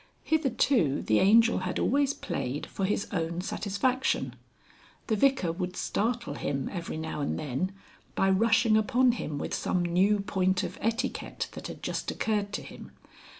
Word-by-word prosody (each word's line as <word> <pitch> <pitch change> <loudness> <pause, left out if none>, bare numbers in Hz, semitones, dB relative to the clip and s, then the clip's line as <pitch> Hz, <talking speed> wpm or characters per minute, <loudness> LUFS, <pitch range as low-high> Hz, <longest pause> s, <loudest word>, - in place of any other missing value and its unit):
Hitherto 260 - +2
the 110 - +3
Angel 230 +4 +5
had 185 -1 -3
always 280 +1 +2
played 140 -5 -3
for 195 - -3
his 200 +1 -1
own 170 -1 -2
satisfaction. 245 +8 -1 0.7
The 220 - +1
Vicar 265 -7 +2
would 180 +1 -4
startle 235 +2 -1
him 135 -1 -2
every 170 -3 -4
now 160 -1 -4
and 140 - -1
then 150 +6 -2 0.4
by 195 0 +3
rushing 225 +2 +4
upon 245 +4 +4
him 155 -11 -4
with - - -4
some 180 -1 0
new 190 +4 +3
point 190 -1 +1
of - - -5
etiquette 230 +4 -2
that - - -7
had - - -9
just - - -2
occurred 210 -2 -1
to - - -3
him. - - -11
200 Hz, 155 wpm, -28 LUFS, 170-230 Hz, 0.7 s, Angel